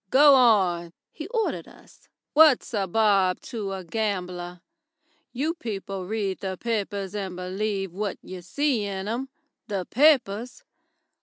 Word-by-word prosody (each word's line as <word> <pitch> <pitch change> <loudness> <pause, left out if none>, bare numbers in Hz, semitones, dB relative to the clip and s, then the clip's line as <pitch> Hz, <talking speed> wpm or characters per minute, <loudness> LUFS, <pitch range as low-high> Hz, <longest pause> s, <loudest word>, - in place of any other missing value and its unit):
"Go 285 +4 +7
on," 190 -9 +3 0.2
he 310 +1 -7
ordered 450 0 -2
us. - - -19 0.3
"What's 300 -5 +5
a 200 -3 0
bob 195 -2 +3
to 210 -6 -5
a 190 -1 -5
gambler? 180 -3 -3 0.7
You 295 +6 -1
people 195 - -5
read 200 -3 -2
the 190 -1 -4
papers 205 -4 -3
and 195 -3 -4
believe 195 +1 -3
what 200 0 -3
you 185 -1 -8
see 255 - 0
in 195 -1 -4
'em. 245 +5 -3 0.4
The 195 -4 -3
papers! 250 - +2
205 Hz, 135 wpm, -25 LUFS, 185-240 Hz, 0.7 s, Go